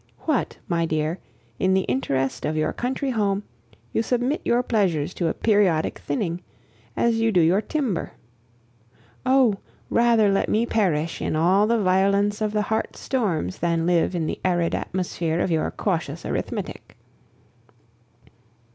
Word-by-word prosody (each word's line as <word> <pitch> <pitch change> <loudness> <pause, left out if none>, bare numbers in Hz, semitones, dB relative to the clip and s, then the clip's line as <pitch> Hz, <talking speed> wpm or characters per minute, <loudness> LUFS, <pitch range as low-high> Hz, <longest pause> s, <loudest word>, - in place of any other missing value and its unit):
What, 305 -7 -1
my 170 -3 0
dear, 155 +2 -1 0.4
in 190 0 +3
the 190 - +3
interest 135 -1 -1
of 150 +1 -1
your 155 - 0
country 265 +2 -2
home, 205 -3 0 0.5
you - - +2
submit 250 +5 0
your 240 +1 +2
pleasures 185 -9 0
to 170 - -1
a - - 0
periodic 200 -7 +2
thinning, 170 +4 -2 0.6
as 235 -1 +2
you 225 0 +2
do 185 - +3
your 175 +5 +4
timber. 255 - -2 1.1
Oh! 255 -6 +4 0.3
rather 230 -3 +4
let 195 - +1
me 225 +2 +2
perish 170 -9 0
in - - -1
all 185 +6 +3
the 235 +1 +2
violence 200 +2 +2
of 215 -1 0
the 210 0 0
heart's 220 +2 -2
storms 185 - -1
than 165 -1 0
live 175 +1 +2
in 165 -2 -1
the - - -3
arid 175 -2 +1
atmosphere 170 -2 -2
of 175 - 0
your 160 -1 +1
cautious - - -3
arithmetic! - - -4
190 Hz, 145 wpm, -24 LUFS, 165-220 Hz, 1.1 s, your